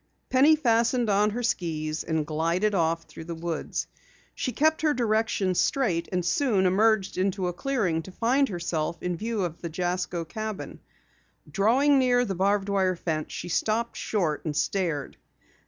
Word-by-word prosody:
Penny 280 Hz, +5 st, +6 dB
fastened 235 Hz, -4 st, +2 dB
on 205 Hz, +1 st, +3 dB
her 240 Hz, +4 st, -4 dB
skis 155 Hz, -8 st, -2 dB
and 160 Hz, -2 st, -1 dB
glided 170 Hz, +7 st, 0 dB
off 165 Hz, -2 st, +1 dB
through 160 Hz, -, -11 dB
the 170 Hz, 0 st, -5 dB
woods. 165 Hz, -1 st, -3 dB, 0.5 s
She 255 Hz, -, -3 dB
kept 315 Hz, +4 st, +2 dB
her 305 Hz, -2 st, +2 dB
directions 215 Hz, -5 st, +1 dB
straight 200 Hz, -12 st, 0 dB
and 180 Hz, -2 st, -1 dB
soon 205 Hz, -2 st, +2 dB
emerged 200 Hz, +1 st, +2 dB
into 190 Hz, -1 st, 0 dB
a 180 Hz, -, -2 dB
clearing 190 Hz, -8 st, -1 dB
to 175 Hz, -, -11 dB
find 260 Hz, +8 st, +1 dB
herself 170 Hz, -3 st, -3 dB
in 180 Hz, -1 st, -1 dB
view 220 Hz, +2 st, -2 dB
of 170 Hz, -2 st, -5 dB
the 170 Hz, -, -4 dB
Jasko 175 Hz, 0 st, -2 dB
cabin. 215 Hz, +4 st, -6 dB, 0.7 s
Drawing 260 Hz, +8 st, +3 dB
near 245 Hz, -1 st, +3 dB
the 195 Hz, -, -2 dB
barbed 195 Hz, +2 st, +1 dB
wire 190 Hz, -2 st, +2 dB
fence 155 Hz, -3 st, -3 dB
she 175 Hz, -, -5 dB
stopped 225 Hz, +6 st, 0 dB
short 170 Hz, -8 st, -1 dB
and 150 Hz, -3 st, -3 dB
stared. 160 Hz, -4 st, -1 dB
190 Hz, 160 wpm, -26 LUFS, 170-230 Hz, 0.7 s, Penny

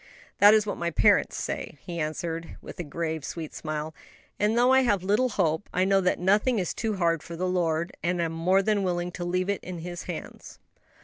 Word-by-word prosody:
"That 205 Hz, +1 st, +8 dB
is 215 Hz, -1 st, +3 dB
what 205 Hz, -, -4 dB
my 170 Hz, 0 st, 0 dB
parents 160 Hz, -, +3 dB
say," -, -, -4 dB
he 170 Hz, -1 st, -5 dB
answered, 165 Hz, +1 st, -4 dB
with -, -, -11 dB
a -, -, -2 dB
grave, 160 Hz, 0 st, -3 dB
sweet 160 Hz, -1 st, -6 dB
smile; 155 Hz, 0 st, -4 dB, 0.5 s
"and 210 Hz, +3 st, +2 dB
though 250 Hz, +2 st, +5 dB
I 265 Hz, -, +6 dB
have 205 Hz, -8 st, +1 dB
little 210 Hz, +7 st, +2 dB
hope, 175 Hz, -4 st, 0 dB
I 185 Hz, +1 st, +1 dB
know 195 Hz, 0 st, +3 dB
that 180 Hz, -, +1 dB
nothing 210 Hz, +7 st, +2 dB
is 180 Hz, -4 st, -1 dB
too 220 Hz, -2 st, -2 dB
hard 170 Hz, -4 st, +1 dB
for 170 Hz, -, -8 dB
the 185 Hz, +2 st, -2 dB
Lord, 170 Hz, -2 st, 0 dB
and 175 Hz, +1 st, 0 dB
am 165 Hz, -1 st, 0 dB
more 180 Hz, +4 st, +2 dB
than 210 Hz, 0 st, +1 dB
willing 175 Hz, -1 st, -1 dB
to 175 Hz, -, -6 dB
leave 180 Hz, +1 st, -1 dB
it 200 Hz, -1 st, -2 dB
in 180 Hz, -1 st, -6 dB
His 175 Hz, +1 st, -7 dB
hands." -, -, -8 dB
180 Hz, 215 wpm, -27 LUFS, 165-200 Hz, 0.5 s, That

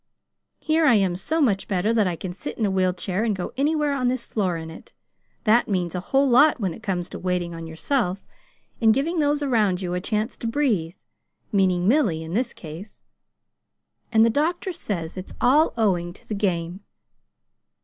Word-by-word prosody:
Here 315 Hz, 0 st, +2 dB
I 240 Hz, -, +6 dB
am 190 Hz, -4 st, +2 dB
so 315 Hz, -, -2 dB
much 210 Hz, -10 st, +1 dB
better 200 Hz, +3 st, +1 dB
that 215 Hz, -4 st, +3 dB
I 175 Hz, -, -1 dB
can 180 Hz, +2 st, -6 dB
sit 185 Hz, -, -7 dB
in 220 Hz, -, +1 dB
a 200 Hz, -, 0 dB
wheel 185 Hz, -1 st, +2 dB
chair 185 Hz, +3 st, -2 dB
and 220 Hz, -3 st, 0 dB
go 180 Hz, -, -5 dB
anywhere 295 Hz, +1 st, +1 dB
on 255 Hz, -3 st, 0 dB
this 250 Hz, -1 st, -1 dB
floor 185 Hz, -6 st, -1 dB
in 160 Hz, 0 st, -7 dB
it. 160 Hz, -, -13 dB, 0.5 s
That 225 Hz, +2 st, +4 dB
means 180 Hz, -4 st, -1 dB
a 180 Hz, -, -2 dB
whole 270 Hz, +10 st, +2 dB
lot 275 Hz, +3 st, +5 dB
when 190 Hz, -6 st, -1 dB
it -, -, -12 dB
comes 180 Hz, -5 st, -2 dB
to -, -, -7 dB
waiting 180 Hz, -2 st, -2 dB
on 165 Hz, 0 st, -7 dB
yourself, 185 Hz, -, -1 dB, 0.6 s
and 220 Hz, -1 st, +5 dB
giving 325 Hz, +5 st, 0 dB
those 295 Hz, 0 st, +1 dB
around 215 Hz, -9 st, +2 dB
you 180 Hz, -2 st, -3 dB
a 180 Hz, -, -2 dB
chance 215 Hz, +2 st, -2 dB
to 230 Hz, -, -4 dB
breathe 225 Hz, -, 0 dB, 0.6 s
meaning 185 Hz, -3 st, +2 dB
Milly, 210 Hz, -, +2 dB
in 160 Hz, +1 st, -7 dB
this 240 Hz, +3 st, 0 dB
case. 170 Hz, +6 st, -11 dB, 1.1 s
And 225 Hz, -1 st, +5 dB
the 230 Hz, -, +3 dB
doctor 340 Hz, -, -1 dB
says 185 Hz, -, -4 dB
it's 185 Hz, -, -8 dB
all 295 Hz, +6 st, +4 dB
owing 175 Hz, -6 st, +1 dB
to -, -, -18 dB
the -, -, -3 dB
game. 180 Hz, -3 st, -1 dB
205 Hz, 195 wpm, -24 LUFS, 180-255 Hz, 1.1 s, I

